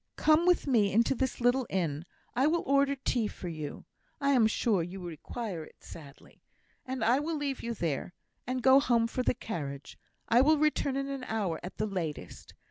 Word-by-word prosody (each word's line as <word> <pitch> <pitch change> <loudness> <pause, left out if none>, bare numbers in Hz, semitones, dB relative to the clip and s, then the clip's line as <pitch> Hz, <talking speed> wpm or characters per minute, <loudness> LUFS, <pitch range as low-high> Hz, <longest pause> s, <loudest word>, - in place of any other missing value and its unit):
Come 315 +3 +3
with 360 - +3
me 225 -8 +3
into 230 +5 +3
this 260 0 -2
little 245 +1 +2
inn; 165 -4 -2 0.3
I 265 +4 +3
will 335 +2 +1
order 280 0 +3
tea 245 -4 -1
for 180 - -7
you 155 -3 -6 0.3
(I 280 -1 +2
am 245 -5 +5
sure 215 -3 +1
you 175 +3 -6
require 175 - -6
it - - -17
sadly) 145 -4 -13 0.5
and 260 0 -3
I 245 +4 +4
will 315 +2 -2
leave 280 -2 -3
you 235 0 -4
there, 170 +1 -3 0.3
and 255 0 -2
go 265 +1 +7
home 240 -5 +2
for 230 +2 -2
the 250 - +1
carriage. 145 - -6 0.3
I 235 +2 +5
will 310 +3 +4
return 295 -2 +1
in 275 0 -2
an 275 -2 -5
hour 200 -7 -2
at 180 - -8
the 215 - 0
latest. 180 -7 -5
235 Hz, 195 wpm, -30 LUFS, 180-275 Hz, 0.5 s, go